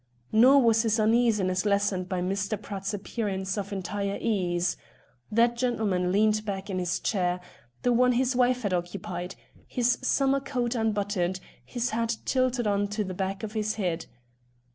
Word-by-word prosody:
Nor 255 +5 +6
was 225 -1 +4
his 225 -1 +1
uneasiness 215 -5 +2
lessened 200 -3 0
by 185 -2 -1
Mr. 195 +3 -1
Pratt's 195 -1 -5
appearance 195 -2 -3
of 200 -1 -4
entire 200 +1 -3
ease. 180 -5 0 0.6
That 235 +2 +3
gentleman 215 -7 0
leaned 215 +2 +3
back 195 -1 -4
in 185 - -1
his 175 -1 -1
chair 180 -4 0 0.4
the 245 - +3
one 250 +1 +4
his 255 +1 +1
wife 250 0 +2
had 200 -3 0
occupied 175 0 -4 0.3
his 245 -1 +1
summer 275 +1 +2
coat 255 -3 -2
unbuttoned, 205 -5 0 0.2
his 245 -1 -3
hat 230 0 -1
tilted 255 -2 +1
on 205 -1 +1
to 210 +1 -2
the 185 -2 -5
back 195 +2 -3
of 215 - -4
his 215 -1 -1
head. 175 -5 -2
210 Hz, 160 wpm, -27 LUFS, 190-235 Hz, 0.6 s, Nor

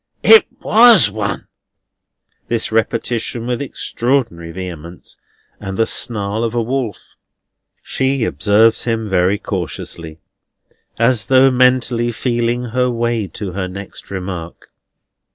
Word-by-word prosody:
It 445 - +7 0.2
WAS 220 - +6
one!" 105 -1 -3 1.0
This 115 -1 -2
repetition 115 +1 -1
with 125 +1 -2
extraordinary 120 -10 -2
vehemence, 85 -1 -8 0.4
and 95 -2 -6
the 115 - +3
snarl 110 -2 -1
of 115 0 -2
a 120 - +1
wolf. 125 -3 -2 0.9
She 130 -1 -1
observes 110 +1 +2
him 115 -2 -1
very 95 +1 +2
cautiously, 80 - -6 0.8
as 115 -2 +2
though 130 +4 +5
mentally 125 -2 +2
feeling 120 0 -1
her 125 +1 +1
way 120 -3 -1
to 95 +3 -6
her 95 0 -3
next 100 +2 -9
remark. 90 -3 -7
115 Hz, 115 wpm, -17 LUFS, 95-125 Hz, 1.0 s, It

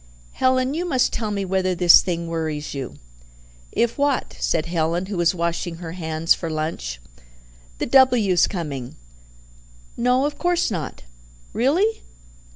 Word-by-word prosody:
"Helen, 255 +1 +1
you 335 +3 -2
must 270 -8 +1
tell 220 -2 -2
me 200 -1 -2
whether 185 -1 0
this 175 0 +7
thing 170 -2 -3
worries 155 -2 -3
you." 135 -3 -6 0.8
"If 235 +3 0
what?" 285 -2 0
said 165 -1 0
Helen, 170 +1 -1
who 195 -1 -5
was 175 +1 +2
washing 170 0 -2
her 165 -1 -7
hands 160 -2 +1
for 165 - -5
lunch. 155 - -4 0.8
"The - - -2
W.'s 240 -9 +4
coming." 145 -9 -5 1.0
"No, 250 +3 +2
of 290 0 -4
course 350 -6 +1
not." 170 -6 -5 0.5
"Really?" 350 - +1
180 Hz, 140 wpm, -22 LUFS, 165-255 Hz, 1.0 s, this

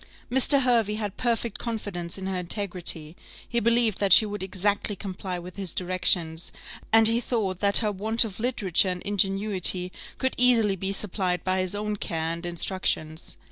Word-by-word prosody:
Mr. 270 +2 +5
Hervey 230 -4 +1
had 210 -2 -4
perfect 235 -2 -2
confidence 205 -7 -5
in 190 - -7
her 190 -1 -3
integrity; 175 -4 -1 0.3
he 235 - -1
believed 230 -2 +1
that 200 -1 0
she 215 - +8
would 205 -1 -5
exactly 200 +2 -1
comply 190 -2 -6
with 175 +2 -10
his 190 -4 -4
directions, 175 -2 0 0.4
and 225 0 +6
he 230 +1 +3
thought 200 -8 -2
that 200 0 +7
her 210 - +1
want 220 +4 +2
of 215 -3 -8
literature 205 -6 +1
and 180 -1 -5
ingenuity 195 -2 +1 0.3
could 260 0 -1
easily 230 -5 +3
be 190 +1 -3
supplied 185 -3 -2
by 185 0 -1
his 185 +1 -1
own 210 0 -3
care 165 -3 -3
and 170 +1 -6
instructions. 170 -2 -3
195 Hz, 170 wpm, -25 LUFS, 180-220 Hz, 0.4 s, she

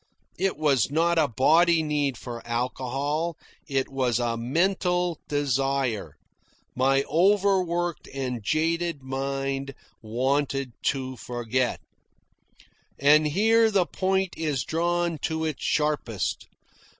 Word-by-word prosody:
It 195 -4 0
was 140 -7 +2
not 165 +3 +2
a 155 - +3
body 160 +7 +4
need 145 -4 0
for 120 -2 -7
alcohol. 135 +7 -2 0.3
It 135 -3 0
was 130 -4 0
a 120 -1 0
mental 175 +6 0
desire. 135 -5 -1 0.6
My 135 +2 +3
over 195 +4 +3
worked 175 -1 -3
and 130 -3 -3
jaded 165 - 0
mind 135 0 -3 0.3
wanted 135 +3 -1
to 130 -2 -1
forget. 120 +1 -2 1.2
And 150 +2 +5
here 225 +7 +4
the 195 -4 +2
point 190 +1 0
is 150 -6 -1
drawn 170 +1 0
to 160 +1 -2
its 155 -3 -4
sharpest. 150 -9 -1
145 Hz, 110 wpm, -26 LUFS, 130-170 Hz, 1.2 s, And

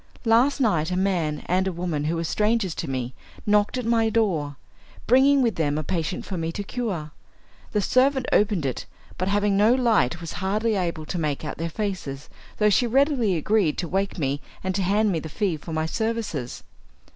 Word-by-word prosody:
Last 240 +6 +4
night 170 - +2
a 180 - -1
man 175 -6 0
and 185 +2 +1
a - - 0
woman 170 -4 -2
who 160 +2 0
were 165 - -2
strangers 210 +1 +1
to 160 - -5
me 130 -1 -3 0.3
knocked 210 +3 +2
at 250 - -3
my 225 -1 +2
door, 170 -11 0 0.5
bringing 270 +3 +5
with 230 -3 0
them 150 -2 0
a 155 - -2
patient 165 +2 -2
for 190 - -4
me 165 0 -2
to 205 - -4
cure. 195 -10 -4 0.6
The 210 -2 0
servant 260 +2 +3
opened 205 -7 +2
it, 130 - -3 0.3
but 185 - 0
having 205 0 +2
no 215 +5 +5
light 220 - +2
was 165 -1 -6
hardly 215 +4 0
able 170 -5 -2
to 175 - -3
make 150 -1 -2
out 150 - -5
their 165 0 -2
faces, 165 -8 -4 0.3
though 210 -1 +3
she 240 +4 +3
readily 255 - +2
agreed 175 0 +1
to 175 - -2
wake 195 +3 -1
me 140 -2 -1 0.2
and 185 0 -1
to 195 - -1
hand 205 +3 +2
me 165 - 0
the 160 - -7
fee 190 +1 -1
for 155 +2 -9
my 160 0 -1
services. 215 - -3
190 Hz, 200 wpm, -24 LUFS, 160-220 Hz, 0.6 s, bringing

